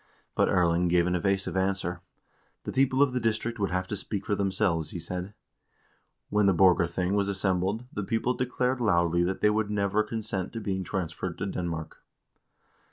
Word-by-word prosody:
But - - +2
Erling 85 0 +2
gave 85 0 +3
an 90 - 0
evasive 95 +2 0
answer. 95 -2 -1 0.6
The - - -4
people 135 +1 +3
of 135 -3 0
the 125 - 0
district 115 0 -1
would 100 - 0
have 95 0 -1
to - - -1
speak 100 0 -4
for - - 0
themselves, 95 -5 +1
he - - -6
said. 90 +3 -5 1.0
When 105 -1 +3
the 95 - +4
Borgarthing 90 0 +3
was 100 -1 +1
assembled, 95 +3 0
the 105 - -2
people 115 +5 0
declared 125 0 -1
loudly 85 -5 +2
that 95 +2 -2
they 105 - +4
would 105 0 0
never 105 0 +1
consent 105 -3 -3
to 115 - -4
being 95 -3 -2
transferred 90 -1 -4
to 100 - -3
Denmark. 85 -4 -4
95 Hz, 175 wpm, -28 LUFS, 90-105 Hz, 1.0 s, the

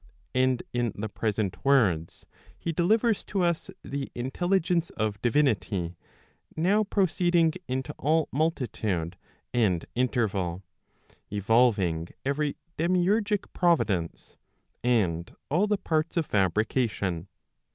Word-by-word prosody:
And 130 -1 +2
in 120 -3 0
the 110 +2 -4
present 105 -3 -2
words, 100 - +2 0.3
he 170 - -3
delivers 215 +7 +2
to 195 -3 -1
us 170 -2 0
the 140 -1 -4
intelligence 170 +6 0
of 105 -1 -3
divinity 110 - +1 0.6
now 195 +7 +3
proceeding 175 -4 +2
into 130 +3 -3
all 155 +2 +2
multitude 110 - -1 0.4
and 100 -9 +2
interval, 100 -8 0 0.7
evolving 100 -6 +2 0.2
every 145 +1 0 0.2
demiurgic 195 +5 +2
providence, 105 - 0 0.5
and 95 -9 +1 0.2
all 180 +8 +3
the 210 -1 +1
parts 160 -1 -1
of 165 - +1
fabri¬ 100 +2 +2
cation. 95 -8 -1
130 Hz, 105 wpm, -27 LUFS, 100-170 Hz, 0.7 s, now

